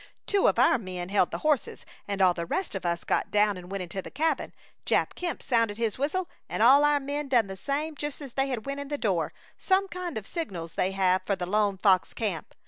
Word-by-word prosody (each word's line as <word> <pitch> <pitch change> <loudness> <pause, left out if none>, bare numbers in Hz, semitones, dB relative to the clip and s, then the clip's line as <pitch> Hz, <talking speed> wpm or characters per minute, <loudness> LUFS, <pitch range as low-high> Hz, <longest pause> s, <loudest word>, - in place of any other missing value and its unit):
"Two 400 -1 +3
of - - +2
our - - +5
men 180 -3 -5
held 195 -3 +3
the - - -4
horses, 300 -5 0 0.2
and 200 -1 0
all 180 -1 +5
the 170 -1 -5
rest 375 - -2
of 190 -3 -3
us 170 0 -1
got - - 0
down 210 0 +3
and 180 -1 -10
went 195 -1 -3
into 180 +2 -5
the - - -9
cabin. 310 +1 -1 0.3
Jap - - +1
Kemp, 350 -2 -4
sounded 230 -4 +1
his 230 -1 -1
whistle 340 +6 0 0.2
and 215 - 0
all 275 +5 +7
our 295 0 +4
men 285 +1 -3
done 245 -5 +3
the 195 -1 -7
same 290 - -2
just 295 -1 -5
as 275 -5 -9
they 270 0 +1
went 275 +5 -5
in 285 - -5
the 290 +1 -3
door 185 - 0 0.3
some 385 0 +2
kind 360 -6 -5
of 210 - -5
signals 180 - -5
they 185 - +1
have 190 -1 +2
for 200 - -1
the 180 -2 -4
Lone 205 +1 +1
Fox 190 -1 +3
Camp! 200 -9 -3
220 Hz, 235 wpm, -27 LUFS, 190-290 Hz, 0.3 s, all